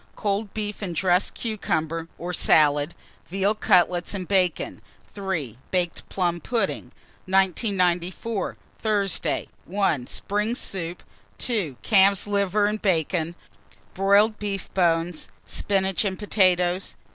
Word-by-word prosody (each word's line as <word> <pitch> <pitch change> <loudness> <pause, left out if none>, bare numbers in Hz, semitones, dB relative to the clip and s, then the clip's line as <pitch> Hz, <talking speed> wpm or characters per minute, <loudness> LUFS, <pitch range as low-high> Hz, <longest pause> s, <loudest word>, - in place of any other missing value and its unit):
Cold 205 0 -1
beef 210 -1 -3
and 180 -4 -4
dressed 180 +2 +2
cucumber 165 -7 -2
or 180 +1 -4
salad, 150 -1 +4 0.3
veal 195 +3 +1
cutlets 180 -3 +2
and 185 -3 -4
bacon. 185 - +1 0.3
3. 165 - -3
Baked 180 -2 -2
plum 175 -2 0
pudding. 235 +5 -1 0.4
1994. 190 +1 +1 0.2
Thursday. 205 -4 0 0.2
1. 175 -9 0
Spring 210 +3 -1
soup. 175 -6 -4 0.3
2. 195 - -1
Calf's 200 -2 +4
liver 205 0 +1
and 210 +1 -1
bacon, 170 -2 0 0.6
broiled 200 +3 +3
beef 200 -2 -4
bones, 165 - +1 0.2
spinach 195 -1 0
and 190 -2 -2
potatoes. 185 -3 +2
190 Hz, 110 wpm, -25 LUFS, 175-205 Hz, 0.6 s, salad